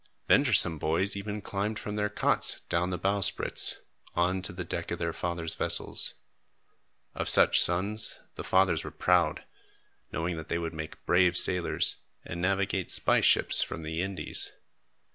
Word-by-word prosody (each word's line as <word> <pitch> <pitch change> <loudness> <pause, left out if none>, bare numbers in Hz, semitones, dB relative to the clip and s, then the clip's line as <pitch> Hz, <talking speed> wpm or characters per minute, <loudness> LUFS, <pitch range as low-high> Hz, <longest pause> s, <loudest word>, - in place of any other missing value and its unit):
Venturesome 100 - +5
boys 85 +7 0
even 105 +1 -6
climbed 105 +2 -4
from 105 0 -7
their 105 0 -2
cots 105 - -1
down 90 +1 -1
the 90 - -4
bowsprits, 100 +2 +1 0.3
on 90 +2 -1
to 95 - -3
the 90 -1 -7
deck 85 - -6
of - - -4
their 85 -1 -4
fathers' 85 -1 -3
vessels. - - 0 1.0
Of - - -2
such - - +5
sons, 100 +5 +2
the - - -9
fathers - - +1
were - - -7
proud, 90 -4 0 0.7
knowing 85 +1 -4
that 80 - -10
they 85 - -2
would 85 0 -5
make 80 0 -9
brave 90 0 +2
sailors 90 -1 +2 0.3
and 85 +1 -7
navigate 95 0 -2
spice - - +2
ships - - +4
from 80 - -5
the 80 +2 -4
Indies. 95 0 0
90 Hz, 155 wpm, -27 LUFS, 85-100 Hz, 1.0 s, Venturesome